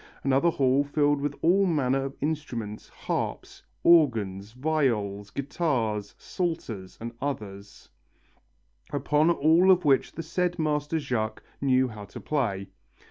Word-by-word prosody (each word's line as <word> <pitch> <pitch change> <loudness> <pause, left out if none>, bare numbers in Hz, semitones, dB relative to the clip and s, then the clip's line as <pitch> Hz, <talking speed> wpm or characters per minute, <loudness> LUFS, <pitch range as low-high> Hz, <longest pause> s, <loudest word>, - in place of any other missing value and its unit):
Another 135 +5 +3
hall 135 -3 +2
filled 145 0 +1
with 145 0 -2
all 190 +4 +4
manner 135 -5 +1
of 135 - -6
instruments, 125 -9 -4
harps, - - -4 0.2
organs, 110 - +3
viols, 120 -8 0
guitars, 120 - -2
psalters, 115 - -4
and 115 +1 -5
others, 100 -8 -6 1.0
upon 150 +3 +2
all 170 +3 +4
of 180 -2 +5
which 135 -2 +3
the 165 - -5
said 175 +2 -1
master 150 0 0
Jacques 120 -7 -2 0.2
knew 130 -1 +3
how 110 -3 -8
to 100 - -10
play. 105 -10 -2
140 Hz, 125 wpm, -27 LUFS, 110-155 Hz, 1.0 s, of